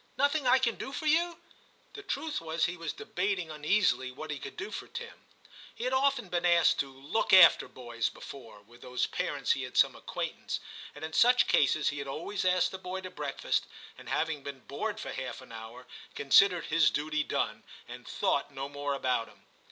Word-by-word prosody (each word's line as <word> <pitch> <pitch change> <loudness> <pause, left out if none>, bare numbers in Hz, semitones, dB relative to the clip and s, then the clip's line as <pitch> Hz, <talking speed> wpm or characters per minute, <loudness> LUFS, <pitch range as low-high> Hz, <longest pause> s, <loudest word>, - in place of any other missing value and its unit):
Nothing 285 0 +2
I 250 +1 +6
can 245 -3 0
do 270 - -6
for 310 - -5
you?' 335 +3 +2 0.5
The 415 - -8
truth 320 - -3
was 160 0 0
he 175 - -2
was 165 -2 -4
debating 180 -3 -2
uneasily 150 -3 +1
what 155 +4 -7
he 145 - -4
could - - -9
do 405 +5 -5
for - - -6
Tim. 470 0 -9 0.5
He - - -6
had 255 +1 0
often 265 -4 +2
been 175 -1 -1
asked 170 -1 +4
to 140 - 0
'look 140 +11 -2
after' 185 - +8
boys 120 -2 -3
before, 115 -6 -11
with 120 +3 -19
whose 125 0 -1
parents - - -1
he - - +1
had - - -6
some - - +5
acquaintance, - - -4 0.4
and 150 +1 -6
in 160 - -8
such 245 +9 +5
cases 150 +2 +3
he 145 - -4
had 140 - -5
always 180 +8 -3
asked 180 0 +3
the 190 - -7
boy 185 +1 -5
to 185 -1 -8
breakfast, 145 -5 -2 0.3
and - - -12
having 160 -2 -1
been 140 -1 -8
bored 210 - -4
for - - -5
half 130 -1 -5
an 130 -2 -14
hour, 115 +2 -9 0.3
considered 180 +5 +5
his 160 0 +4
duty 155 0 -1
done, - - -2 0.3
and - - -10
thought - - 0
no 135 -1 -5
more 145 0 -3
about 125 -4 0
him. - - -20
160 Hz, 200 wpm, -30 LUFS, 140-215 Hz, 0.5 s, after